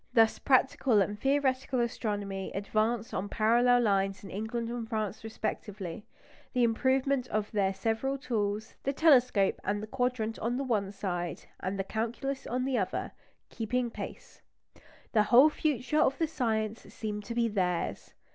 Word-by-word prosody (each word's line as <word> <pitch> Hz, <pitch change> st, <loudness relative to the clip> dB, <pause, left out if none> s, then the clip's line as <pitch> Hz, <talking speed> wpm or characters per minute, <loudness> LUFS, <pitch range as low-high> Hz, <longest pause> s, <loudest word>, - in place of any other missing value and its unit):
Thus 225 Hz, -1 st, +5 dB
practical 260 Hz, -3 st, +3 dB
and 205 Hz, +1 st, 0 dB
theoretical 265 Hz, -1 st, +1 dB
astronomy 205 Hz, -5 st, -2 dB
advanced 215 Hz, +3 st, 0 dB
on 195 Hz, +2 st, -2 dB
parallel 240 Hz, +3 st, +4 dB
lines 195 Hz, -3 st, +1 dB
in 195 Hz, -, -9 dB
England 225 Hz, +3 st, -3 dB
and 235 Hz, -2 st, -4 dB
France 215 Hz, -2 st, -3 dB
respectively, 205 Hz, -4 st, -5 dB, 0.5 s
the 250 Hz, -2 st, +3 dB
improvement 260 Hz, +3 st, +2 dB
of 215 Hz, -3 st, -2 dB
their 195 Hz, -3 st, +2 dB
several 225 Hz, +7 st, -1 dB
tools 215 Hz, -5 st, -2 dB
the 275 Hz, -, -1 dB
telescope 250 Hz, -10 st, +4 dB
and 205 Hz, 0 st, 0 dB
the 215 Hz, -, -5 dB
quadrant 245 Hz, -2 st, -1 dB
on 240 Hz, +2 st, -1 dB
the 275 Hz, -, -1 dB
one 210 Hz, -7 st, 0 dB
side, 175 Hz, -5 st, -3 dB, 0.2 s
and 190 Hz, +2 st, -3 dB
the 195 Hz, -, -1 dB
calculus 235 Hz, +6 st, -3 dB
on 250 Hz, +2 st, -1 dB
the 265 Hz, -3 st, +1 dB
other 190 Hz, -, -2 dB, 0.4 s
keeping 240 Hz, +1 st, -1 dB
pace. -, -, -8 dB, 0.7 s
The 215 Hz, -, +4 dB
whole 265 Hz, +6 st, +8 dB
future 295 Hz, -1 st, 0 dB
of 275 Hz, -2 st, +3 dB
the 330 Hz, -, +2 dB
science 225 Hz, -7 st, -1 dB
seemed 210 Hz, -1 st, -4 dB
to 235 Hz, -, -5 dB
be 235 Hz, -1 st, +2 dB
theirs. 180 Hz, -5 st, -2 dB
225 Hz, 155 wpm, -30 LUFS, 205-250 Hz, 0.7 s, whole